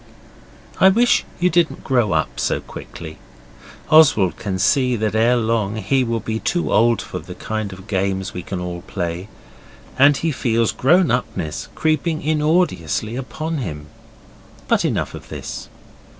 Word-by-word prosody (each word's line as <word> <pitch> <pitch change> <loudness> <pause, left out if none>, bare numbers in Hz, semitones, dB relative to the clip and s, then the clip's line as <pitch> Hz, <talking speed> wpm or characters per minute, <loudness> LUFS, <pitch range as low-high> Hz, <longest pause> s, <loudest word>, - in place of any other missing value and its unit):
I 190 - +7
wish 235 +5 +3
you 180 +1 +2
didn't 170 -1 +1
grow 120 -7 +1
up 80 -1 -1
so - - 0
quickly. 80 -1 -10 0.7
Oswald 140 - +5
can 100 -5 -3
see 125 +6 +2
that 110 -1 -1
ere 115 +3 +3
long 110 -3 0
he 130 +4 +1
will 115 -1 -1
be 110 +1 -3
too 175 +8 -1
old 115 +1 +3
for - - -6
the - - -10
kind 110 -2 -4
of 95 0 -11
games 95 -1 -1
we 90 - -5
can 95 +1 -5
all 90 -1 -5
play, 90 +2 -4 0.7
and 140 +1 +6
he 165 +2 -1
feels 115 -4 +1
grown 175 +7 +3
upness 110 -10 -2
creeping 155 +1 0
inordiously 150 - 0
upon 155 +4 -4
him. 75 - -6 0.8
But - - +2
enough - - -1
of - - -10
this. - - -7
115 Hz, 150 wpm, -20 LUFS, 95-150 Hz, 0.8 s, I